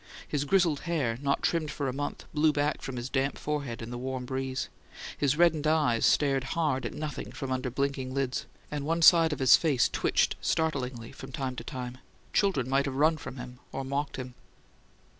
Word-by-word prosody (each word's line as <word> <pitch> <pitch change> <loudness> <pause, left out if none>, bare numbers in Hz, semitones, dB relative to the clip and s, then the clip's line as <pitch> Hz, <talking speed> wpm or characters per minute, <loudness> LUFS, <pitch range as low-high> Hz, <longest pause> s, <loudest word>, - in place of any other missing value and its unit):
His 145 -1 -1
grizzled 170 -3 +3
hair, 125 -9 0
not 140 -1 0
trimmed 165 -3 +1
for 145 -2 -3
a 130 - -1
month, 145 +2 -4
blew 155 +1 +4
back 145 0 0
from 135 - -5
his 120 0 -4
damp 135 +1 0
forehead 140 -6 -3
in 115 - -7
the 120 - -5
warm 130 0 -3
breeze; 130 0 -2 0.5
his 145 0 +1
reddened 160 -3 +4
eyes 150 -7 +3
stared 135 -3 +3
hard 150 -6 +1
at - - -8
nothing 150 -1 -5
from 135 -2 -5
under 130 0 -1
blinking 135 0 -2
lids; 135 -1 -2 0.2
and 145 -1 -3
one 165 +3 0
side 165 -1 +7
of 150 - -2
his 130 -2 +7
face 145 -7 +3
twitched - - +1
startlingly 130 -7 -1
from 135 - -10
time 130 -1 -3
to - - -6
time; 125 -1 -6 0.3
children 185 - +2
might 135 +1 +2
have 135 -2 -3
run 155 +4 +4
from 135 - -8
him, 125 0 -8
or 135 - -4
mocked 140 +2 -2
him. 130 -1 -6
140 Hz, 195 wpm, -29 LUFS, 130-150 Hz, 0.5 s, side